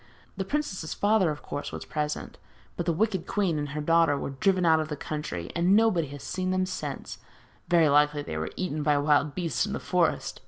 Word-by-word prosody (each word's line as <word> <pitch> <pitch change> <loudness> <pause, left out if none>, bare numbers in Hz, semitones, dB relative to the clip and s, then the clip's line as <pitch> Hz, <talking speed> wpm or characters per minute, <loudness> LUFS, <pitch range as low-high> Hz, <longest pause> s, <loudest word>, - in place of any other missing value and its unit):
The 195 -1 -3
princess's 195 - -3
father, 205 -4 +3
of 150 -1 -5
course, 145 - -5
was - - -6
present, 150 -1 -4 0.4
but 175 - -4
the - - +4
wicked 190 0 0
queen 180 -7 0
and 145 -1 -3
her 150 +2 -4
daughter 165 -1 +3
were 140 - -4
driven 185 +6 +1
out 160 -1 +5
of 155 - -2
the 150 - -4
country, 140 - -5
and 170 +1 +1
as 190 - +5
nobody 210 -8 +3
has 145 0 -9
seen 185 0 -2
them 185 0 +1
since, 185 - -5 0.5
very 170 -3 +4
likely 145 0 +3
they 80 - -6
were 80 0 -3
eaten 155 -5 -2
by 145 -1 +3
wild 145 0 +2
beasts 175 +3 -1
in 205 - -4
the - - -2
forest. 180 -2 0
160 Hz, 220 wpm, -27 LUFS, 150-185 Hz, 0.5 s, out